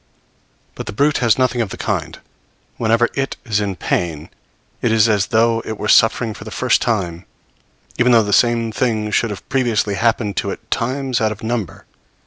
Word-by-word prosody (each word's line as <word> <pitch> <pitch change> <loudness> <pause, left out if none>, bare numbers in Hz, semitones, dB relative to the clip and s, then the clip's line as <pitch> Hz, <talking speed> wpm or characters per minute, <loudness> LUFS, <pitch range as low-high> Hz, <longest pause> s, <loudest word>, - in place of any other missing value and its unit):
But - - -8
the - - -5
brute 145 +7 +2
has 115 -3 +3
nothing 125 -2 +1
of 110 - -2
the - - -7
kind; - - -3 0.6
whenever 115 +1 +2
it 135 0 -2
is 105 -3 0
in 100 -2 -2
pain, 80 -3 -2 0.5
it 120 - +1
is 110 0 +4
as 105 -3 +1
though 115 0 +2
it 110 - -5
were - - -4
suffering 115 0 +3
for - - -10
the 110 - -8
first 125 +2 +1
time, 90 -7 -2 0.7
even 125 0 +4
though 115 -2 +6
the 105 0 -2
same 115 +1 +2
thing 110 -3 -1
should 115 - +1
have 105 - -8
previously 120 -6 0
happened 110 -1 0
to - - -1
it - - -8
times 130 0 -1
out 110 -1 +1
of 105 - -8
number. 110 -6 -4
115 Hz, 190 wpm, -19 LUFS, 105-120 Hz, 0.7 s, though